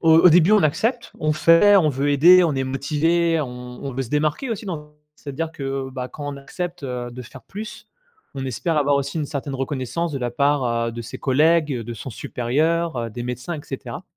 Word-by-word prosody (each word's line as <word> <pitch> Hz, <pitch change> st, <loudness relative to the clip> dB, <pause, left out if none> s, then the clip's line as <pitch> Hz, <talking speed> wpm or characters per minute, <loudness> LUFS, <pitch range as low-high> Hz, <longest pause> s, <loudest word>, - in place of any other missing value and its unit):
au 165 Hz, -1 st, +5 dB
au 180 Hz, -, +8 dB
début 175 Hz, +4 st, +5 dB
on 210 Hz, -5 st, +5 dB
accepte, 225 Hz, -, 0 dB
on 155 Hz, 0 st, +1 dB
fait, 165 Hz, +6 st, +6 dB
on 165 Hz, -5 st, +4 dB
veut 140 Hz, +1 st, 0 dB
aider, 175 Hz, +6 st, +7 dB
on 160 Hz, -4 st, +1 dB
est 135 Hz, 0 st, -1 dB
motivés, 160 Hz, +5 st, +1 dB
on 125 Hz, -2 st, -7 dB
on 135 Hz, -, -4 dB
veut 135 Hz, -, -2 dB
se 120 Hz, -, -9 dB
démarquer 150 Hz, -, 0 dB
aussi 220 Hz, -1 st, -4 dB
dans 150 Hz, -5 st, -6 dB, 0.2 s
c'est-à-dire 155 Hz, +3 st, -5 dB
que, 135 Hz, -2 st, -4 dB
bah, 130 Hz, -1 st, -5 dB
quand 145 Hz, +1 st, -7 dB
on -, -, -8 dB
accepte, 170 Hz, +3 st, -6 dB
heu, 125 Hz, -1 st, -4 dB
de 125 Hz, +1 st, -8 dB
faire 120 Hz, -, -13 dB
plus, 210 Hz, +2 st, -9 dB, 0.5 s
on 135 Hz, -, -3 dB
espère 155 Hz, +6 st, -2 dB
avoir 145 Hz, -1 st, +3 dB
aussi 140 Hz, +3 st, -2 dB
une 150 Hz, -, -2 dB
certaine 140 Hz, -1 st, -4 dB
reconnaissance 140 Hz, +5 st, -3 dB
de 140 Hz, -, -2 dB
la 120 Hz, -1 st, -2 dB
part, 140 Hz, +2 st, +1 dB, 0.2 s
heu, 115 Hz, -, -5 dB
de 120 Hz, -, -6 dB
ses 115 Hz, -, -8 dB
collègues, 155 Hz, +3 st, +3 dB
de 120 Hz, +1 st, -6 dB
son 115 Hz, -, -8 dB
supérieur, 135 Hz, +3 st, -1 dB
des 120 Hz, +3 st, -6 dB
médecins 125 Hz, +7 st, -4 dB
et 155 Hz, -, -6 dB
cetera. 135 Hz, -, -7 dB
145 Hz, 215 wpm, -22 LUFS, 130-165 Hz, 0.5 s, au